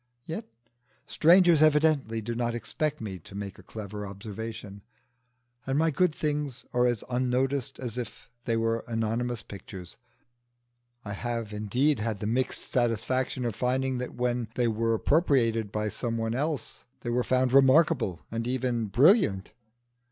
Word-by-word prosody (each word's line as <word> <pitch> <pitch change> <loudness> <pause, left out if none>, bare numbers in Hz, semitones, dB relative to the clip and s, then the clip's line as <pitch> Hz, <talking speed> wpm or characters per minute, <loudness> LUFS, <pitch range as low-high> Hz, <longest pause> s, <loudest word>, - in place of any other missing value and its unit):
Yet 170 +8 -5 0.6
strangers 175 -1 +5
evidently 150 -7 +3
do 120 +2 -3
not 120 0 -1
expect 145 +5 -2
me 95 -4 -5
to 95 - -13
make 100 -2 -6
a - - -11
clever 105 +1 -7
observation, 105 0 -7 0.9
and 135 +1 +1
my 160 +1 +3
good 180 +4 +2
things 145 -4 -2
are 125 0 +3
as 120 -3 -1
unnoticed 130 +2 0
as 125 -2 -4
if 120 - -7 0.2
they 115 -2 +1
were 115 0 0
anonymous 115 +1 -2
pictures. 95 -3 -10 1.1
I 105 - -4
have 115 0 -4
indeed 120 +8 +1
had 110 -1 -2
the 105 - -5
mixed 125 +4 -1
satisfaction 125 +2 0
of 115 - -1
finding 130 0 0
that 125 - -5
when 120 -1 -1
they 120 -1 +2
were 115 0 +1
appropriated 115 - +2
by 105 0 -1
some 115 +1 -3
one 115 0 -1
else 145 +3 -3 0.2
they 120 - -3
were 125 +1 +1
found 130 0 +1
remarkable 135 - +4
and 115 +1 -3
even 125 -3 -1
brilliant. 120 - +4
120 Hz, 150 wpm, -28 LUFS, 110-135 Hz, 1.1 s, strangers